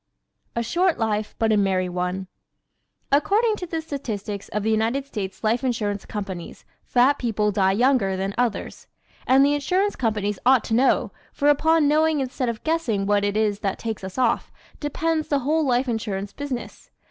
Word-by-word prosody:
A 235 - 0
Short 355 +7 +1
Life 215 -2 -1
But 225 -1 +2
a 215 - +4
Merry 190 -2 +1
One 180 +1 -2
¶ - - -33 0.8
According 425 +10 +3
to 360 - -6
the 325 -1 -3
statistics 215 -9 -5
of 210 0 -2
the 220 - +1
United 225 +5 0
States 200 -8 -6
Life 230 +4 +1
Insurance 210 -6 -2
Companies 195 -5 -6 0.2
fat 255 +3 +3
people 215 -3 0
die 190 -1 +2
younger 225 -4 +2
than 195 +1 -2
others. 240 -3 -2 0.4
And 265 +2 +6
the 285 - +3
Insurance 365 +8 0
Companies 210 -4 -1
ought 255 -1 +5
to - - -3
know, 255 +4 +3 0.2
for 290 - +2
upon 315 +1 +4
knowing 310 +1 +3
instead 260 -1 -2
of 230 -2 -5
guessing 285 -12 0
what 205 0 +2
it 205 +1 0
is 210 -2 +1
that 195 -3 -2
takes 225 -4 -5
us 190 0 -7
off, 250 -3 +1 0.3
depends 315 +1 -1
the 285 - +1
whole 310 +5 +1
life 255 -1 +1
insurance 205 -4 -3
business. 275 -4 -6
235 Hz, 180 wpm, -23 LUFS, 205-285 Hz, 0.8 s, And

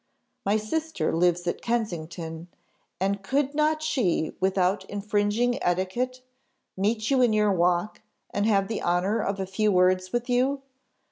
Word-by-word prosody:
My 205 +2 +3
sister 315 - -2
lives 175 +1 +2
at 175 - -2
Kensington, 170 -7 -3 0.5
and 195 +1 0
could 275 +7 0
not 310 +1 +1
she, 195 - 0
without 190 0 +1
infringing 205 +4 0
etiquette, 240 +9 -1 0.5
meet 215 +4 0
you 265 -2 +4
in 240 -3 +4
your 210 -1 +3
walk, 175 +2 +1 0.3
and 205 +1 0
have 195 -3 +2
the 220 - -3
honour 185 +6 +1
of 195 -1 -2
a 190 - -1
few 210 +3 +1
words 185 0 +3
with 240 0 -1
you? 265 +3 +1
205 Hz, 145 wpm, -26 LUFS, 185-240 Hz, 0.5 s, you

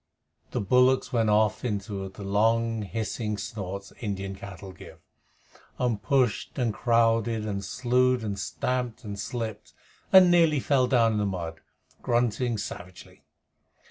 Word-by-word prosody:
The - - -2
bullocks 125 +5 +3
went 115 -3 +2
off 105 0 +2
into 100 -4 -3
the 100 +2 -10
long 115 +3 +1
hissing 105 +1 -3
snorts 100 -2 -6
that - - -21
Indian 100 -2 -3
cattle 95 -1 -9
give, 90 - -13 0.8
and 120 -5 0
pushed 125 -1 0
and 120 -4 0
crowded 115 -1 +2
and 100 -2 -3
slued 125 +3 +1
and 100 -2 -3
stamped 125 +4 -2
and 100 -2 -6
slipped 110 -3 -5 0.4
and 185 -2 +8
nearly 165 -4 +4
fell 130 -2 +2
down 115 -4 +3
in 110 - -1
the 105 - +1
mud, 85 -4 -5 0.4
grunting 120 0 0
savagely. 90 -3 -8
110 Hz, 140 wpm, -27 LUFS, 100-125 Hz, 0.8 s, and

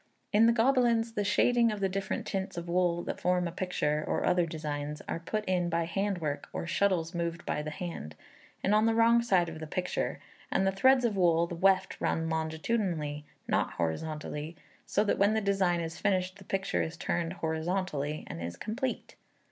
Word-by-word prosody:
In 220 +2 +6
the - - +6
Gobelins 235 -1 +3
the 210 - 0
shading 235 +3 +3
of 210 - -4
the 195 - +2
different 195 +1 -3
tints 190 -2 -3
of 170 0 -4
wool 175 0 +1
that - - -5
form 180 -1 +2
a - - -4
picture, 155 -4 -1
or - - 0
other 175 -1 +3
designs, 150 -2 -4
are - - -2
put 210 +5 -3
in 180 -2 +1
by 170 0 +1
hand 195 +4 -1
work, 150 -4 -3
or - - -4
shuttles 170 -1 +1
moved 170 -1 -3
by 150 - -1
the 150 - -4
hand, 155 - -6 0.5
and 200 - +2
on 215 +1 +4
the 225 - +2
wrong 230 +1 +5
side 190 -7 +3
of 160 -1 -7
the 155 - -6
picture, 180 +3 -2 0.3
and 190 - +2
the 195 - +3
threads 255 +6 +4
of 220 -3 +1
wool, 170 -3 +4
the 170 - -7
weft 190 +2 +2
run 165 0 0
longitudinally, 160 -2 -1 0.2
not - - +1
horizontally, 150 - -3 0.3
so 205 - +2
that 210 - 0
when 200 +2 +4
the - - +3
design 195 -4 +1
is 165 0 -5
finished 185 -1 0
the 195 - -13
picture 190 0 -1
is 160 +1 -4
turned 170 0 -1
horizontally, 160 -3 -2
and 85 - -7
is 85 +1 -5
complete. 250 - -3
180 Hz, 195 wpm, -30 LUFS, 160-200 Hz, 0.5 s, In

